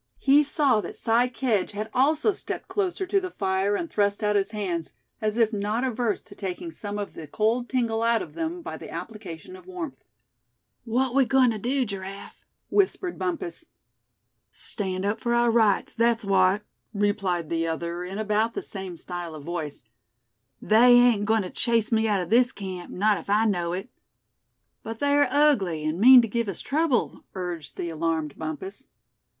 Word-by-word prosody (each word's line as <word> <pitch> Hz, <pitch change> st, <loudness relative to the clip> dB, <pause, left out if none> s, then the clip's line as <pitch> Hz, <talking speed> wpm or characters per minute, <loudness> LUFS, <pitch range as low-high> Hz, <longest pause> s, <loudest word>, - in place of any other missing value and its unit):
He 280 Hz, +2 st, +5 dB
saw 275 Hz, -6 st, +2 dB
that -, -, -7 dB
Si 235 Hz, +2 st, +2 dB
Kedge 235 Hz, -6 st, -1 dB
had 215 Hz, +2 st, -5 dB
also 305 Hz, +10 st, +3 dB
stepped -, -, -6 dB
closer 380 Hz, -2 st, -1 dB
to 395 Hz, +2 st, +2 dB
the 370 Hz, -, -4 dB
fire, 195 Hz, -, 0 dB
and 335 Hz, -, -2 dB
thrust 205 Hz, -5 st, 0 dB
out 210 Hz, 0 st, +2 dB
his 195 Hz, 0 st, +1 dB
hands, 185 Hz, -7 st, -3 dB, 0.3 s
as 215 Hz, +1 st, -1 dB
if 225 Hz, -1 st, +3 dB
not 210 Hz, +4 st, -1 dB
averse 240 Hz, -4 st, -1 dB
to 205 Hz, -, -14 dB
taking 200 Hz, -, -5 dB
some 205 Hz, -8 st, -6 dB
of 205 Hz, -1 st, -5 dB
the 155 Hz, -, -9 dB
cold 225 Hz, -, 0 dB
tingle 230 Hz, -3 st, 0 dB
out 230 Hz, -1 st, +2 dB
of -, -, -11 dB
them 335 Hz, +1 st, -4 dB
by -, -, -6 dB
the -, -, -10 dB
application 210 Hz, -, -8 dB
of 370 Hz, -1 st, -15 dB
warmth. 350 Hz, -6 st, -7 dB, 0.8 s
"What 250 Hz, +2 st, 0 dB
we 270 Hz, 0 st, +4 dB
goin' 260 Hz, -1 st, +4 dB
to 220 Hz, -, -4 dB
do, 255 Hz, +4 st, 0 dB
Giraffe?" 195 Hz, -1 st, -8 dB, 0.3 s
whispered 380 Hz, -2 st, +1 dB
Bumpus. 350 Hz, -1 st, -3 dB, 0.9 s
"Stand 190 Hz, -2 st, -3 dB
up 210 Hz, +2 st, 0 dB
for 235 Hz, 0 st, +1 dB
our 240 Hz, 0 st, +3 dB
rights, 220 Hz, -4 st, +2 dB
that's 230 Hz, -1 st, +1 dB
what," 195 Hz, +1 st, +3 dB, 0.3 s
replied 195 Hz, -5 st, 0 dB
the 165 Hz, 0 st, 0 dB
other, 170 Hz, +2 st, -3 dB
in 185 Hz, +2 st, -6 dB
about 215 Hz, +1 st, 0 dB
the -, -, -3 dB
same 190 Hz, -3 st, -7 dB
style 175 Hz, -2 st, -5 dB
of 150 Hz, -, -9 dB
voice. 160 Hz, -4 st, -5 dB, 0.8 s
"They 235 Hz, +3 st, +6 dB
ain't 245 Hz, -4 st, +5 dB
going 220 Hz, 0 st, +2 dB
to 180 Hz, -, -7 dB
chase 230 Hz, -1 st, +1 dB
me 220 Hz, 0 st, +2 dB
out 205 Hz, -3 st, +1 dB
of 175 Hz, +2 st, -6 dB
this 245 Hz, +2 st, +5 dB
camp, 185 Hz, -5 st, -7 dB
not 205 Hz, 0 st, +2 dB
if 170 Hz, -, -12 dB
I 210 Hz, +2 st, +3 dB
know 175 Hz, -5 st, 0 dB
it." 190 Hz, +5 st, -4 dB, 0.9 s
"But 225 Hz, 0 st, -6 dB
they're 285 Hz, +2 st, +3 dB
ugly, 210 Hz, -, +2 dB
and 155 Hz, +3 st, -1 dB
mean 250 Hz, +1 st, +9 dB
to -, -, -1 dB
give 230 Hz, 0 st, -1 dB
us 190 Hz, -, -5 dB
trouble," 295 Hz, -3 st, 0 dB
urged 175 Hz, -5 st, -5 dB
the 170 Hz, -, -3 dB
alarmed 160 Hz, -2 st, -2 dB
Bumpus. 190 Hz, -, -6 dB
215 Hz, 180 wpm, -26 LUFS, 190-250 Hz, 0.9 s, mean